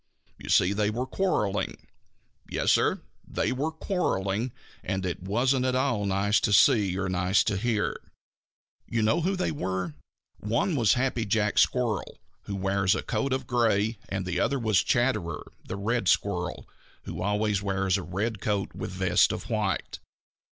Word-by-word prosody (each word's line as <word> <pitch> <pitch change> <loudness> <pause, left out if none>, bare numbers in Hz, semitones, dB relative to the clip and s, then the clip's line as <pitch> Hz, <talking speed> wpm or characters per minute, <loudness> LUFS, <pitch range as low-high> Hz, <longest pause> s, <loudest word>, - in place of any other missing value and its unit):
You - - -9
see 90 +2 +4
they 105 0 +1
were 120 +4 -2
quarreling. 105 - -1 0.6
Yes, - - +1
Sir, - - +2 0.2
they - - -1
were 140 +5 -1
quarreling, 120 - -1 0.3
and 95 0 -2
it 90 -1 -3
wasn't 125 +7 +1
at 130 0 +1
all 125 -6 +1
nice 100 +2 +2
to 110 - 0
see 100 -3 +4
or 95 0 -1
nice 95 +1 +2
to 105 - 0
hear. 110 +1 0 0.9
You 115 -2 0
know 110 +9 +2
who 190 +4 0
they 185 - -1
were. 95 - -3 0.5
One 120 - 0
was 115 -7 +4
Happy 125 -2 0
Jack 105 0 +1
Squirrel, 120 -6 +1 0.3
who 100 - -4
wears 95 0 +1
a - - -3
coat 140 -1 -1
of 130 0 -1
gray, 115 -3 +1
and 95 -1 -3
the 90 0 -2
other 140 - +1
was 110 -7 +2
Chatterer 105 -11 0 0.2
the 95 - -6
Red 115 +4 -1
Squirrel, 90 0 0 0.4
who - - -6
always 105 0 0
wears 95 -1 0
a 100 - -1
red 100 +4 -3
coat 100 -2 -1
with - - -5
vest 95 -1 +3
of 115 - -6
white. 105 -5 -1
105 Hz, 165 wpm, -27 LUFS, 95-120 Hz, 0.9 s, see